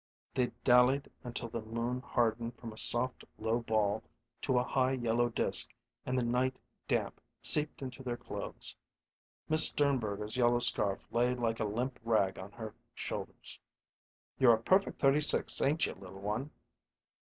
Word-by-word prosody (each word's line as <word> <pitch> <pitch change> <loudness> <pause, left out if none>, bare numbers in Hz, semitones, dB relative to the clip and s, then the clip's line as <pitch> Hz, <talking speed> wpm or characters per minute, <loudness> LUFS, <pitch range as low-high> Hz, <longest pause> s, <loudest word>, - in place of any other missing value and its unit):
They 125 -1 +1 0.2
dallied 125 +2 +4
until 120 -1 -5
the 115 - -5
moon 115 +3 -3
hardened 115 -1 -1
from 115 -2 -9
a - - -15
soft, 125 +2 0
low 115 +2 -1
ball 110 -2 0 0.4
to 130 -3 0
a 125 - +3
high, 130 +1 0
yellow 120 -1 0
disk 115 - 0 0.3
and 130 0 -1
the 125 - +1
night 125 +2 0 0.3
damp - - -2 0.2
seeped 150 -2 +6
into 130 +1 -7
their 120 -2 -4
clothes. - - -8 0.7
Miss 155 0 +8
Sternberger's 110 -6 -1
yellow 120 -1 +3
scarf 100 -5 0
lay 120 +2 +1
like 115 -2 -2
a 110 - 0
limp 120 +5 -3
rag 105 -5 +1
on 95 +2 -9
her 110 -2 -8 0.2
shoulders. - - -7 0.8
"You're 120 -3 +6
a 110 - -9
perfect 190 +7 +2
thirty 140 +2 +3
six, 150 - +3
ain't 150 +4 +2
you, - - -4
little 95 0 -12
one?" 105 +8 -3
120 Hz, 155 wpm, -32 LUFS, 110-130 Hz, 0.8 s, Miss